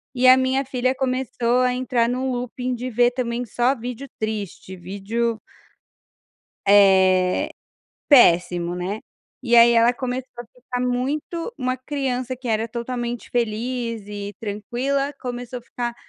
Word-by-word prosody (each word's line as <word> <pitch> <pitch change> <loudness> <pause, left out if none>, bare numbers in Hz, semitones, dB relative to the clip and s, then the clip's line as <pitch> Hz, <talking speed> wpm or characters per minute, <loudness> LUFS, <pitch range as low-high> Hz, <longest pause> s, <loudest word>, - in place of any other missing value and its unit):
e 255 +1 +4
a 255 - +10
minha 260 +1 +1
filha 255 0 0
começou 255 -2 0
a 250 0 +2
entrar 250 -2 +1
no 255 +1 -1
looping 250 +1 -3
de 250 +1 -4
ver 240 +1 +3
também 245 -1 -2
só 245 +3 +1
vídeo 250 +2 -6
triste, 210 -3 -4
vídeo 205 +6 -3 1.3
Eh, 190 -2 +5 0.6
péssimo, 175 - +5
né. 185 +4 -4 0.4
E 240 -2 +3
aí 235 0 +8
ela 235 +1 +5
começou 255 +1 -4
a 240 - -6
ficar 250 +1 -6
muito 285 - -2
uma 255 0 -1
criança 255 -1 -3
que 255 0 -10
era 225 0 0
totalmente 240 0 -4
feliz 230 -1 -2
e 205 0 -6
tranquila 250 +7 -2
começou 245 0 -5
a - - -23
ficar 240 0 -4
245 Hz, 140 wpm, -22 LUFS, 220-255 Hz, 1.3 s, a